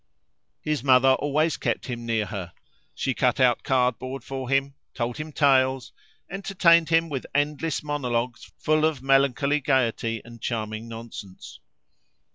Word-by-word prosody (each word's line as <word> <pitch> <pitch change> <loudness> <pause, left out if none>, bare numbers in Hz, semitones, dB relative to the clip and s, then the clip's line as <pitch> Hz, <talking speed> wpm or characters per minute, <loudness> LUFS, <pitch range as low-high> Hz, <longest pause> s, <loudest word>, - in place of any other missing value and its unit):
His 150 -4 -1
mother 130 -1 +5
always 145 +4 +1
kept - - -2
him 120 -2 -6
near 110 -2 0
her; 95 -5 -6 0.4
she - - -1
cut - - +1
out - - +3
cardboard 130 0 -1
for 130 -2 -6
him, 135 0 +1 0.2
told 120 +2 -3
him 155 0 -6
tales, 130 -3 +2 0.3
entertained 175 -4 +3
him 165 0 +3
with 140 -5 -5
endless 150 +2 0
monologues 125 -5 -3
full 155 0 +1
of 155 -5 0
melancholy 135 +1 +2
gaiety 120 -5 0
and 115 -1 -13
charming 110 -1 -4
nonsense. 115 -4 -10
135 Hz, 135 wpm, -25 LUFS, 120-145 Hz, 0.4 s, mother